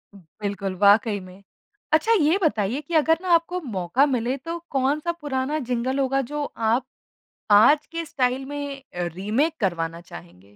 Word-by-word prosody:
बिल्कुल, 195 +2 -5
वाक़ई 205 +2 +4
में। 185 +1 -14 0.5
अच्छा 315 +9 +3
ये 315 +6 +3
बताइए 245 -1 0
कि 330 +4 -10
अगर 320 +1 +4
ना 370 - -4
आपको 340 +2 +2
मौका 215 - +1
मिले 255 -2 -1
तो 330 +5 -5
कौन-सा 285 +5 0
पुराना 285 +1 -2
जिंगल 255 +3 -1
होगा 270 0 +1
जो 295 0 -2 0.2
आप 240 +3 +2 0.7
आज 285 +9 +6
के 330 0 -4
स्टाइल 260 -2 -1
में 285 -1 -6
अ, 175 -1 -1
रीमेक 220 - 0
करवाना 170 -4 -2
चाहेंगे? 85 - -13
260 Hz, 155 wpm, -24 LUFS, 200-295 Hz, 0.7 s, आज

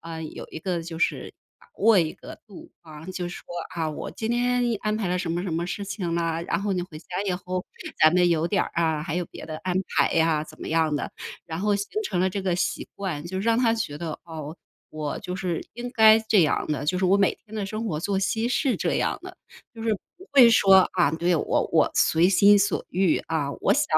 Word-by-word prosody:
啊， 165 -1 -7
有 155 - -7
一 - - -6
个 175 0 -2
就 165 0 -7
是 - - -1 0.3
把 - - -22
握 220 -1 +5
一 160 -3 +1
个 - - -11
度 200 -5 -13
啊。 155 -1 -12
就 185 -1 -4
说 175 - -9 0.3
啊， 160 -2 -1
我 150 - -6
今 220 0 -4
天 245 +1 +1 0.2
安 215 0 -1
排 210 -4 -2
了 180 +1 0
什 180 -2 -3
么 170 +1 -1
什 185 -3 -3
么 170 +2 -1
事 200 +3 -4
情 185 -4 -3
了， 165 -1 -1
然 170 - -1
后 205 -1 0
你 180 - -1
回 165 -3 -9
家 180 +3 -5
以 185 - +1
后 180 0 -4 0.4
咱 155 - +8
们 180 0 +4
有 165 -1 +1
点 200 - +2
儿 - - -6
啊， 160 -3 +1
还 155 - -4
有 180 -2 -2
别 - - -10
的 155 - -6
安 185 0 -2
排 - - +2
呀， 160 -2 +2
怎 155 0 -13
么 - - -6
样 160 -2 +1
的。 145 - -4 0.3
然 160 -1 -6
后 205 +1 +2
形 200 - -3 0.2
成 285 - -2
了 185 +1 +2
这 200 - -3
个 185 -2 0
习 - - -2
惯， 175 -7 -4
就 190 +2 -4
让 230 +3 +2
他 235 -3 +3
觉 220 -11 -3
得， 160 -2 -5
哦， 160 -1 -7 0.3
我 150 -2 -4
就 180 -2 -5
是 180 -4 -3
应 240 +1 -5
该 220 -2 +7
这 220 -3 +3
样 155 - +1
的， 145 -2 -2
就 180 +4 +1
是 190 - 0
我 185 +2 +4
每 200 -1 +2
天 220 - -12
的 210 -2 -2
生 215 +3 -4
活 155 -7 -2
作 195 +2 -1
息 220 +4 0
是 255 +1 +1
这 - - -1
样 - - 0
的。 - - -10 0.4
就 225 - -8
是 225 -1 +1 0.2
不 370 +2 -15
会 260 -4 +8
说 195 -4 +6 0.2
啊， 175 -6 +3
对， 170 +2 +1
我 - - 0
我 - - +4
随 165 +3 +4
心 200 +2 +6
所 200 +1 0
欲 185 -2 +2
啊， 155 -3 -1
我 - - +3
想 295 - +2
180 Hz, 265 characters per minute, -25 LUFS, 165-205 Hz, 0.4 s, 咱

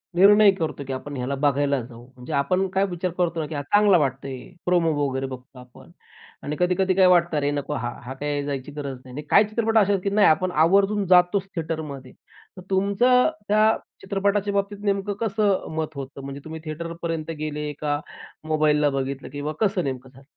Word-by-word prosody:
निर्णय 205 +2 +7
करतो 160 -6 -4
की 135 - -3
आपण 140 +2 -6
ह्याला 125 +3 -2
बघायला 140 0 +1
जाऊ. 120 0 -12
म्हणजे 125 +5 -8
आपण 185 +7 +1
काय 195 +1 +2
विचार 175 +1 -3
करतो 170 -2 0
ना 155 - -1
की 155 - -6
"हा 145 - -2
चांगला 205 +6 +4
वाटतोय," 135 -2 -2 0.3
प्रोमो 175 -2 +2 0.2
वगैरे 135 0 -3
बघतो 130 0 -10
आपण. 125 0 -16 0.5
आणि 150 - -3
कधी-कधी 185 +1 +2
काय 190 - +5
वाटतं, 170 -3 +3
"अरे! 145 0 +1
नको 145 0 -3
हा. 120 -4 -2
हा 130 - -6
काही 145 +1 -3
जायची 140 0 -4
गरज 140 -2 -5
नाही." 130 - -12
आणि 150 - -4
काही 200 - +6
चित्रपट 225 +1 0
अशा 205 -2 +4
आहेत 195 -2 0
की 200 - 0
नाही 205 0 +4
आपण 180 +3 +2
आवर्जून 195 +6 +3
जातोच 180 +2 +4
थिएटरमध्ये. 155 -5 -5 0.5
तर - - -8
तुमचं 200 +8 +3 0.2
त्या 215 +1 +4 0.3
चित्रपटाच्या 200 +1 0
बाबतीत 200 +1 -1
नेमकं 200 0 0
कसं 205 -2 +1
मत 155 -1 -3
होतं 140 0 -7
म्हणजे 140 +1 -7
तुम्ही 160 0 -7
थिएटरपर्यंत 165 0 -5
गेले, 150 -1 -3
का 145 -1 0 0.5
मोबाईलला 150 -1 +2
बघितलं 135 0 -4
किंवा 145 +2 -4
कसं 200 -4 +1
नेमकं 130 -2 -5
झालं? 135 +1 -18
160 Hz, 190 wpm, -24 LUFS, 140-195 Hz, 0.5 s, निर्णय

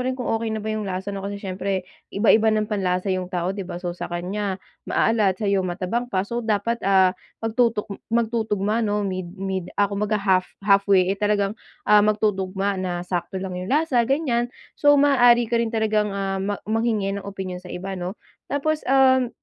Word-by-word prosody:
rin 255 +1 -1
kung 250 - -4
okey 225 0 -1
na 220 -1 -3
ba 220 - -1
yong 215 -2 -3
lasa 190 +2 -3
no. 195 - -4
Kasi 200 +1 -4
siyempre 190 -1 -3 0.2
iba-iba 220 +2 +4
ng 215 0 +2
panlasa 190 -1 0
yung 185 -1 -2
tao, 180 0 -1
'di 195 -2 -6
ba? 175 - -5
So 175 0 -4
sa 175 - -6
kanya 190 +3 -3 0.3
maalat, 210 -5 +2
sayo 200 -2 +1
matabang 185 +6 -2
pa, 190 -3 0
so 235 +3 -3
dapat 225 +1 0
ah, 190 -2 +5 0.3
magtutok 225 -1 +1 0.2
magtutugma 220 -2 0
no 210 -2 0
mid 185 -2 -3
mid 190 -2 -3
ako 205 0 +2
mag - - -8
ha - - -4 0.2
half 185 - -18 0.2
halfway 195 -2 +4
eh 200 - -6
talagang 205 -1 +1 0.3
ah, 210 0 +6
magtutugma 200 -2 0
na 175 -1 -3
sakto 180 +1 -3
lang 190 0 -4
yung 185 - -6
lasa 290 -2 +2
ganyan. 255 -4 +1 0.2
So 290 0 +4
maaari 245 -4 +5
ka 235 - +3
rin 235 - 0
talagang 215 -2 +1
ah, 195 -1 -2
mang 200 +1 -2
manghingi 220 -2 0
ng 200 - -3
opinyon 190 -2 -5
sa 180 - -12
iba 190 +2 -5
'no? 180 +4 -4 0.3
Tapos, 305 +2 0
um, 260 -1 +5
205 Hz, 190 wpm, -23 LUFS, 190-225 Hz, 0.3 s, ah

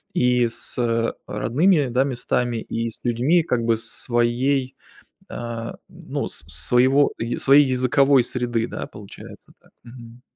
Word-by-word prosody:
и 125 -1 +2
с, 120 +1 -1
э, 115 -1 0
родными, 150 - +1
да, 125 +2 +2
местами, 120 -2 -1
и 115 +1 -4
с 115 - -4
людьми, 130 +9 +2
как 125 -7 -1
бы, 115 -1 +1
своей, 125 +3 0 0.5
а, 115 -1 -6 0.2
ну - - -5
с - - -3
с - - -5
своего 130 +3 +3
ие 115 +1 -3
своей 140 +2 +6
языковой 130 +1 +3
среды, 120 -2 -2
да, - - -6
получается 105 -2 -13
так. - - -27
Мгм. 120 0 -13
120 Hz, 145 wpm, -22 LUFS, 115-130 Hz, 0.5 s, своей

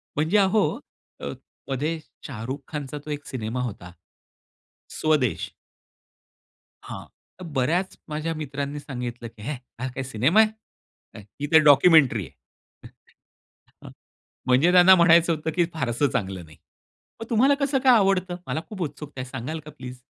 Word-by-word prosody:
म्हणजे 160 +7 +2
अहो, 200 +1 +3 0.6
अ, - - -4 0.4
मध्ये 150 +5 -2 0.3
शाहरुख 130 +1 -5
खानचा 150 -2 -5
तो - - -9
एक 145 -1 -5
सिनेमा 115 -1 -4
होता. 100 -7 -6 1.1
स्वदेश. 150 -7 +1 1.4
हां, - - -8 0.4
तर - - -7
बऱ्याच 165 +5 -1
माझ्या 155 +2 -3
मित्रांनी 145 -1 -4
सांगितलं 125 -4 -6
की 110 -2 -16
"हे 140 - -3 0.3
हा 130 - -2
काय 130 - -3
सिनेमा 135 - +3
आहे? 220 - -4 0.2
ही 145 - -1
तर 160 - +9
डॉक्युमेंटरी 145 - +6
आहे." 65 - -19 0.5
हं, - - -13 0.9
हां. - - -9 0.6
म्हणजे 130 +8 +4
त्यांना 180 +1 +8
म्हणायचं 170 -1 +5
होतं, 155 +1 -3
की 175 - +4
फारसं 135 -2 0
चांगलं 95 -7 -3
नाही. 80 -1 -17 0.6
मग 225 - -6
तुम्हाला 255 +5 +4
कसं 275 -1 +1
काय 260 - +7
आवडतं? 190 -3 +1
मला 135 +5 -2
खूप 200 -4 -6
उत्सुकता 145 -3 -6
आहे, 130 - -6
सांगाल 135 +5 -5
का - - -8
प्लीज? 130 -4 -10
150 Hz, 145 wpm, -24 LUFS, 125-170 Hz, 1.4 s, तर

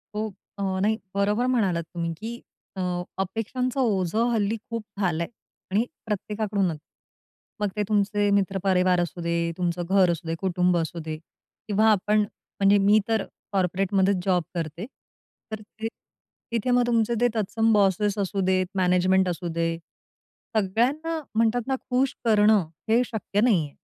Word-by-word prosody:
हो. 215 +1 -1 0.3
अ, 200 - -3 0.2
नाही. 215 +2 +2 0.2
बरोबर 205 +4 +1
म्हणालात 190 -8 +1
तुम्ही 170 -1 -2
की 230 +5 -6 0.4
अ, 190 - -3 0.4
अपेक्षांचं 235 +7 -2
ओझं 215 -3 +1
हल्ली 215 -1 +1
खूप 230 -2 -3 0.2
झालाय 170 -4 0 0.4
आणि 210 +5 +2 0.2
प्रत्येकाकडूनच. 205 -4 -1 0.8
मग 210 - +1
ते 210 - 0
तुमचे 205 0 +2
मित्र 195 0 0
परिवार 185 -2 +3
असू 175 0 -4
दे, 170 0 0
तुमचं 175 -1 -1
घर 190 -2 +5
असू 165 0 -5
दे, 165 - -1
कुटुंब 180 -1 +2
असू 170 +1 -2
दे 155 -1 -5 0.5
किंवा 215 +1 +3
आपण 210 +1 +2
म्हणजे 205 -1 +1
मी 210 +2 +6
तर 225 -2 +1 0.3
कॉर्पोरेटमध्येच 190 +1 +1
जॉब 180 -3 +2
करते 165 +3 -4 0.7
तर 215 -1 -5
ते 220 +1 -7 0.6
तिथे 235 +2 0
मग 245 0 +4
तुमचे 230 -1 +2
ते 245 - +5
तत्सम 225 +1 +1
बॉसेस 205 0 +2
असू 195 0 -1
देत, 185 0 +2
मॅनेजमेंट 185 0 +3
असू 175 0 -3
दे. 165 0 0 0.8
सगळ्यांना 255 - +1 0.2
म्हणतात 230 +2 +2
ना, 265 - +1
खुश 255 +1 +1
करणं 210 -4 +4 0.2
हे 230 +2 +5
शक्य 205 -1 -1
नाहीये. 175 - +2
200 Hz, 145 wpm, -25 LUFS, 180-220 Hz, 0.8 s, मी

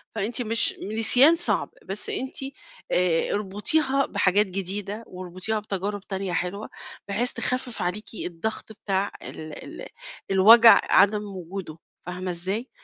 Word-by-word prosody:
فأنتِ 225 +4 -2
مش 230 -1 0 0.2
نسيان 260 +8 +6
صعب، 345 +1 0 0.2
بس - - -4
أنتِ 265 -11 -4 0.6
آآ 175 -2 +1
اربطيها 265 - +1
بحاجات 200 0 +2
جديدة 195 +3 -4
واربطيها 185 +4 -4
بتجارب 205 0 -4
تانية 190 -2 -4
حلوة، 180 +4 -3 0.4
بحيث 230 +5 0
تخفّف 250 -3 -2
عليكِ 180 +4 -2 0.2
الضغط 200 +6 -5
بتاع 200 -2 -2
ال 155 -1 -9
ال - - -9 0.4
الوجع 225 +5 +8
عدم 210 +1 +4
وجوده، 180 -2 -7 0.3
فاهمة 180 +1 -4
إزاي؟ 190 +8 -3
200 Hz, 120 wpm, -25 LUFS, 185-225 Hz, 0.6 s, الوجع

